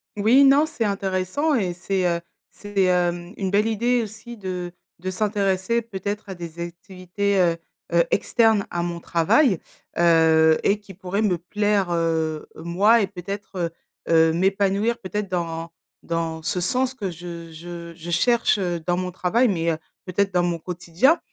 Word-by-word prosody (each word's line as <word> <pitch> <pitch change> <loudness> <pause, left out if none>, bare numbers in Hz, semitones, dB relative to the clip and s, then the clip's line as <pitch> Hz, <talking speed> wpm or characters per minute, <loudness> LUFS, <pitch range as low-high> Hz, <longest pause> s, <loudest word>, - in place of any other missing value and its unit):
Oui, 225 +7 +5
non 280 +2 +6
c'est 315 -8 -3
intéressant 195 - 0
et 195 -9 0
c'est, 185 +1 -1
heu, 170 -1 0 0.3
c'est, 205 -1 -2
hem, 175 0 0
une 190 -2 -2
belle 205 +2 +3
idée 235 +3 +1
aussi 220 +3 -9
de 180 -3 -5 0.3
de 185 +2 -3
s'intéresser 200 +2 0
peut-être 205 -1 -5
à 190 - -5
des 170 -2 -9
activités, 185 +3 -3
heu 170 -2 +3 0.4
heu, 170 0 +5
externes 225 -4 +2
à 175 - -1
mon 170 0 -3
travail, 175 - +3 0.4
heu 160 -2 +5
et 205 +1 +2
qui 205 -2 -13
pourraient 190 +3 -2
me 195 -5 +2
plaire, 200 +1 0
heu, 160 -2 -1
moi 200 +7 +3
et 200 - +1
peut-être, 200 +1 -7
heu 170 -2 0 0.4
heu, 160 -1 +5
m'épanouir 195 +5 +1
peut-être 205 +1 -4
dans 165 -2 -3 0.3
dans 165 -1 -2
ce 180 - -2
sens 255 +8 0
que 200 -7 -4
je 170 -1 -8
je 170 +1 -8
je 165 +1 -9
cherche, 235 +6 +3
heu, 175 -3 -1
dans 175 0 +2
mon 185 0 -2
travail, 200 +8 +2
mais, 170 -4 0
heu, 160 - -2 0.3
peut-être 195 +1 0
dans 180 -1 +3
mon 175 -1 0
quotidien. 180 - +1
185 Hz, 165 wpm, -23 LUFS, 170-205 Hz, 0.4 s, non